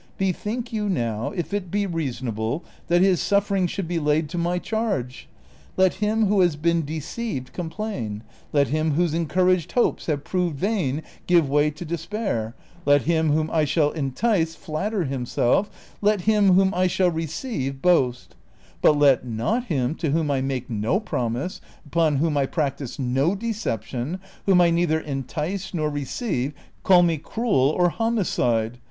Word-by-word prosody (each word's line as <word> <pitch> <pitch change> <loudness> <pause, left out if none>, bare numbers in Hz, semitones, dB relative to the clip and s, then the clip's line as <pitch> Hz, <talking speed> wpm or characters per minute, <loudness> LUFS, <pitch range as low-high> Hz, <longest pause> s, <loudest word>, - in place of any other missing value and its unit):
Bethink 210 +6 -2
you 210 -2 -1
now 115 - -1
if 175 +3 -4
it 200 -3 -2
be 205 +3 0
reasonable 130 - -3 0.2
that 175 +1 +4
his 190 -3 +3
suffering 200 -2 +2
should 180 0 -4
be 170 0 -1
laid 150 0 +1
to 175 - -5
my 175 +1 0
charge. 195 - -3 0.5
Let 185 -1 +4
him 215 +1 +2
who 205 0 +2
has 175 -4 +3
been 170 +2 +1
deceived 155 - -5
complain, 160 - -4 0.3
let 140 -2 +2
him 155 +1 +1
whose 170 +1 +1
encouraged 180 +1 +1
hopes 245 - +1
have 145 -3 -1
proved 180 -4 -1
vain 160 - -1 0.2
give 170 -4 +4
way 145 +2 +3
to 155 +4 -8
despair, 165 - -3 0.3
let 145 -2 +4
him 160 -2 +2
whom 155 +1 +1
I 160 -2 +2
shall 150 0 +2
entice 165 - 0
flatter 190 +6 -2
himself, 135 - 0 0.3
let 210 -1 +2
him 205 -1 +4
whom 190 +1 +4
I 185 +1 +2
shall 180 0 +2
receive 160 - -3
boast; 135 -7 +1 0.5
but 150 - +5
let 140 -4 +5
not 125 - -1
him 135 - 0
to 160 - -1
whom 155 0 +1
I 135 -2 +1
make 130 -2 -2
no 115 - 0
promise, 125 - -3 0.2
x;pon 160 0 +1
whom 150 +1 +1
I 140 -1 +2
practise 140 -5 -3
no 135 +7 +1
deception, 165 - -3 0.3
whom 185 -2 +6
I 170 -1 +4
neither 165 -2 +2
entice 160 +7 -4
nor 155 -2 0
receive 145 - -2 0.3
call 180 -2 +6
me 165 -3 +1
cruel 195 - +1
or 180 -1 +4
homicide. 125 - 0
165 Hz, 160 wpm, -24 LUFS, 140-190 Hz, 0.5 s, whom